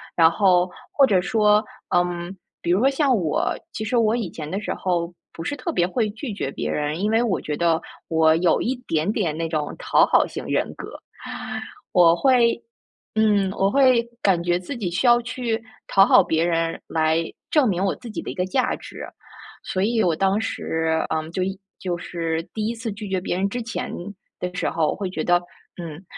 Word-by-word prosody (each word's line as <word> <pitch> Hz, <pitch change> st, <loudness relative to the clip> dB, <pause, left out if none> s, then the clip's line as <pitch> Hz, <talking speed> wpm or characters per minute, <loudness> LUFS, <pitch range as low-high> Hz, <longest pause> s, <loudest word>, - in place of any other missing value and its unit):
然 165 Hz, -1 st, +6 dB
后 180 Hz, 0 st, +3 dB, 0.2 s
或 275 Hz, -2 st, +5 dB
者 195 Hz, -5 st, +3 dB
说， 210 Hz, +2 st, +3 dB, 0.3 s
嗯， 175 Hz, +1 st, -1 dB, 0.2 s
比 -, -, -3 dB
如 180 Hz, -, +4 dB
说 260 Hz, -, +4 dB
像 275 Hz, -1 st, +3 dB
我， 165 Hz, -6 st, 0 dB, 0.2 s
其 220 Hz, -, -4 dB
实 220 Hz, +3 st, 0 dB
我 225 Hz, -1 st, +3 dB
以 225 Hz, -7 st, -2 dB
前 155 Hz, -2 st, -7 dB
的 195 Hz, -, -1 dB
时 -, -, -3 dB
候 175 Hz, -2 st, -1 dB, 0.2 s
不 165 Hz, -, -8 dB
是 290 Hz, -, -2 dB
特 340 Hz, +4 st, -3 dB
别 175 Hz, -, +1 dB
会 220 Hz, +3 st, 0 dB
拒 230 Hz, +3 st, -6 dB
绝 140 Hz, -9 st, -3 dB
别 -, -, -4 dB
人， 150 Hz, +2 st, -1 dB
因 210 Hz, -, +1 dB
为 225 Hz, +2 st, +3 dB
我 225 Hz, -6 st, 0 dB
觉 150 Hz, -1 st, -3 dB
得 165 Hz, -1 st, +2 dB, 0.3 s
我 160 Hz, -1 st, +4 dB
有 170 Hz, +1 st, +2 dB
一 260 Hz, -, 0 dB
点 160 Hz, +4 st, +1 dB
点 180 Hz, -9 st, -1 dB
那 165 Hz, 0 st, -2 dB
种 155 Hz, -2 st, -2 dB
讨 -, -, +4 dB
好 -, -, +3 dB
型 -, -, -7 dB
人 -, -, 0 dB
格。 -, -, -9 dB, 0.9 s
我 170 Hz, -2 st, +6 dB
会 240 Hz, +1 st, +3 dB, 0.5 s
嗯， 210 Hz, -3 st, +3 dB
我 195 Hz, +1 st, +2 dB
会 255 Hz, -3 st, +5 dB, 0.2 s
感 180 Hz, -4 st, +2 dB
觉 175 Hz, 0 st, +1 dB
自 215 Hz, +9 st, -6 dB
己 190 Hz, -7 st, -3 dB
需 180 Hz, +9 st, +1 dB
要 240 Hz, 0 st, +7 dB
去 235 Hz, -2 st, -3 dB, 0.2 s
讨 195 Hz, 0 st, +6 dB
好 195 Hz, -, +6 dB
别 165 Hz, -1 st, +1 dB
人 165 Hz, -1 st, 0 dB
来 160 Hz, 0 st, +1 dB, 0.3 s
证 295 Hz, -5 st, +4 dB
明 190 Hz, -3 st, 0 dB
我 195 Hz, -, +1 dB
自 245 Hz, -, -11 dB
己 -, -, -4 dB
的 -, -, -7 dB
一 -, -, -9 dB
个 180 Hz, -, 0 dB
价 255 Hz, +8 st, 0 dB
值， -, -, -9 dB, 0.6 s
所 185 Hz, -, -2 dB
以 225 Hz, +1 st, +2 dB
我 170 Hz, -3 st, +2 dB
当 195 Hz, +4 st, +2 dB
时， 160 Hz, -7 st, -1 dB
嗯， 160 Hz, +1 st, -2 dB
就 185 Hz, -, -2 dB
一 190 Hz, +1 st, -3 dB, 0.2 s
就 180 Hz, -2 st, -2 dB
是 165 Hz, -2 st, -3 dB
第 215 Hz, -1 st, -2 dB
1 235 Hz, -, -2 dB
次 230 Hz, -1 st, -4 dB
拒 205 Hz, 0 st, -7 dB
绝 190 Hz, -1 st, 0 dB
别 180 Hz, -, -2 dB
人 195 Hz, +2 st, 0 dB
之 245 Hz, +3 st, -3 dB
前 230 Hz, -, -4 dB, 0.5 s
的 180 Hz, 0 st, -4 dB
时 180 Hz, -, 0 dB
候， 160 Hz, -2 st, +1 dB
我 -, -, -1 dB
会 195 Hz, -2 st, -3 dB
觉 160 Hz, -4 st, -3 dB
得： 175 Hz, 0 st, +3 dB, 0.4 s
“嗯， 165 Hz, +1 st, -8 dB
185 Hz, 225 characters per minute, -23 LUFS, 165-220 Hz, 0.9 s, 要